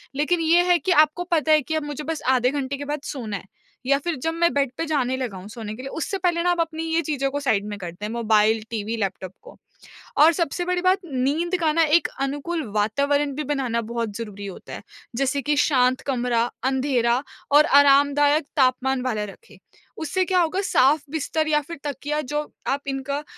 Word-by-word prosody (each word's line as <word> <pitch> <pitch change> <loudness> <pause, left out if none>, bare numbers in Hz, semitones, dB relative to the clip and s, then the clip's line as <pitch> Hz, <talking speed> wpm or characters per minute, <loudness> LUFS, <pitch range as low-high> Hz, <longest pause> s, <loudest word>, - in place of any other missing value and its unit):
लेकिन 300 +5 +1
ये 335 +2 +4
है 350 - +6
कि 360 - -1
आपको 310 -1 +4
पता 315 -1 +2
है 305 -1 +6
कि 315 +4 -4
अब 315 - -1
मुझे 295 0 -5
बस 320 +1 -4
आधे 250 0 +3
घंटे 280 -1 -3
के 285 - -6
बाद 295 0 -3
सोना 225 -10 -4
है - - -12 0.4
या 280 +1 +3
फिर 345 - 0
जब 325 0 0
मैं 340 +1 +2
बेड 280 -3 +1
पे 330 - -2
जाने 260 -4 0
लगा 235 -7 -4
हूँ 185 +2 -10
सोने 215 -2 -7
के 255 - -9
लिए, 270 - -6
उससे 360 +7 -3
पहले 345 -2 0
ना 355 - +3
आप 350 - -1
अपनी 325 0 -3
ये 325 +1 +1
चीज़ों 280 -3 -1
को 285 - -2
साइड 220 -8 0
में 205 - -5
कर 175 -3 -6
दें 205 +5 -7
मोबाइल, 220 -1 +2
टीवी, 220 +1 -3
लैपटॉप 190 -3 -3
को। - - -14 0.6
और 320 +3 +7
सबसे 340 +2 -2
बड़ी 360 0 0
बात 370 +1 +3
नींद 300 +6 -1
का 315 -2 +2
ना 330 0 +4
एक - - -2
अनुकूल 290 +4 -2
वातावरण 280 +7 +1
भी 300 - -3
बनाना 255 -5 -1
बहुत 230 -2 -4
ज़रूरी 205 -3 -7
होता 190 - -10
है, - - -7 0.3
जैसे 275 +2 0
कि 295 +2 0
शांत 255 -3 +3
कमरा, 245 -3 +1 0.2
अँधेरा 260 -1 +1 0.3
और 295 +1 +7
आरामदायक 285 +1 +4
तापमान 260 0 +2
वाला 220 -5 -1
रखें। 465 - -19 0.4
उससे 370 +4 0
क्या 365 0 +2
होगा 350 +3 +1
साफ़ 290 -4 +3
बिस्तर 315 0 -1
या 300 -1 +3
फिर 335 - -7
तकिया 290 +1 -3
जो 295 +3 -2 0.3
आप 275 +1 0
इनका 280 +2 -3
280 Hz, 210 wpm, -23 LUFS, 250-315 Hz, 0.6 s, और